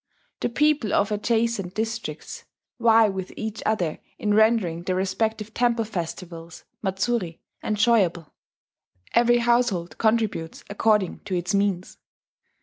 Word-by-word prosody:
The - - -1
people 290 -3 +2
of 200 +1 +2
adjacent 220 -3 0
districts 220 0 -4 0.3
vie 225 -1 +6
with 190 -2 -4
each 220 -1 -4
other 180 -8 0 0.2
in 210 -1 0
rendering 215 -6 +3
their 185 +1 -2
respective 215 +3 -1
temple 235 -2 +1
festivals 170 -3 -6 0.2
(matsuri) 190 -2 -1 0.2
enjoyable: 210 -7 +1 0.8
every 240 +1 +5
household 235 -7 +1
contributes 220 -7 0
according 210 -3 +1
to 190 - -2
its 180 +3 -1
means. 200 -2 -1
210 Hz, 115 wpm, -24 LUFS, 185-230 Hz, 0.8 s, vie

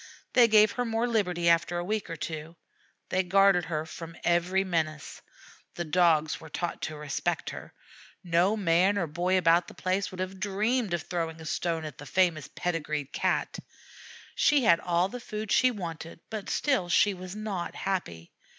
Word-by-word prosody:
They 245 -2 +7
gave 215 -1 +6
her 245 - -2
more 230 0 0
liberty 180 -7 0
after 170 +1 +3
a 175 - -2
week 210 +1 -2
or 165 - -4
two. 160 +1 -6 0.5
They 185 - +2
guarded 190 -1 +4
her 155 -2 -3
from 165 0 -9
every 175 +3 +2
menace. 160 -5 -3 0.5
The 175 - -3
Dogs 160 -2 +2
were 160 - -11
taught 175 +3 -4
to 155 - -4
respect 150 -1 -2
her. - - -10 0.5
No 180 +4 +2
man 190 +1 +3
or 180 - +1
boy 175 +4 0
about 170 0 +3
the - - -12
place 185 +1 -1
would 185 - -10
have 185 +1 -4
dreamed 210 +1 0
of 175 - -5
throwing 165 -2 -3
a 160 - -9
stone 165 0 -2
at 150 -3 -8
the 145 - -9
famous 170 -2 +1
pedigreed 150 -5 -3
Cat. - - -1 0.7
She 290 -3 +3
had 170 -6 +5
all 175 +1 +1
the 245 +5 -7
food 215 -2 -6
she 255 - +5
wanted, 170 -7 -6
but 215 -3 -5
still 260 -12 0
she 195 +4 +4
was 185 +1 -8
not 210 -5 -4
happy. 85 - -4
175 Hz, 180 wpm, -28 LUFS, 165-200 Hz, 0.7 s, They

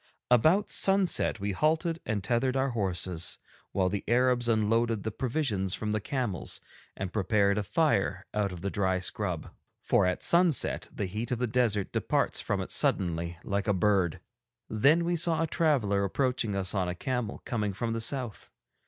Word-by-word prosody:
About 160 - +4
sunset 195 - +3
we 100 +1 -2
halted 160 - 0
and 105 -3 -1
tethered 125 +4 +1
our 135 0 +1
horses, 90 -6 -2 0.3
while 95 -2 +1
the 100 +2 -2
Arabs 120 0 +2
unloaded 115 0 +1
the 110 - -2
provisions 115 -7 -1
from 105 -1 -3
the 105 0 -1
camels 120 -5 -3 0.4
and 95 -1 -4
prepared 100 0 +2
a - - 0
fire 100 - 0
out 105 -2 0
of 90 -2 -8
the 100 - -2
dry 95 -2 0
scrub, 90 -2 -3 0.3
for - - +2
at 90 - -1
sunset 170 -4 +2
the 100 - -3
heat 105 +5 -4
of 125 - -1
the 125 - 0
desert 110 -4 0
departs - - 0
from - - -1
it - - -6
suddenly, 85 -1 +1
like 100 +1 -2
a 105 - +2
bird. 95 -3 +1 0.5
Then 150 +10 +3
we 175 0 +1
saw 165 -1 +1
a - - +2
traveller 135 - +1
approaching 120 0 -1
us 95 -2 -1
on 95 -3 0
a 90 - -3
camel 125 +2 -3
coming 105 -4 -1
from 115 +4 -3
the 115 - -3
south. 120 -2 -3
110 Hz, 175 wpm, -29 LUFS, 95-130 Hz, 0.5 s, About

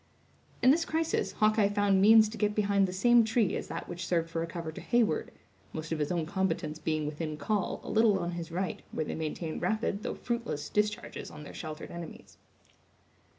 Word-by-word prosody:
In 255 - +8
this 330 +4 +3
crisis, 325 -1 -1
Hawkeye 215 -1 +3
found 205 -2 +3
means 220 +1 +8
to 225 - -8
get 210 -1 +1
behind 200 -2 +3
the - - -4
same 240 +5 +5
tree 220 -2 +1
as - - -4
that - - -5
which 175 0 -5
served 165 -2 0
for 165 - -1
a 165 - -2
cover 170 -2 -5
to - - -9
Heyward; 240 -3 +1 0.4
most 160 0 -5
of 160 - -1
his 150 +2 -1
own 170 -3 0
combatants 165 -3 -1
being 155 -2 -1
within 150 +1 -4
call, 200 +6 -1
a - - -5
little 220 -2 +4
on 175 -1 -2
his 170 -1 -5
right, 185 +2 -2
where 155 - -2
they - - -4
maintained 160 +1 -4
rapid, 215 -2 0
though - - -3
fruitless, 235 -10 -3
discharges 210 0 -1
on 150 - -10
their - - -10
sheltered 155 -1 -7
enemies. 170 -1 -9
190 Hz, 200 wpm, -30 LUFS, 165-215 Hz, 0.4 s, In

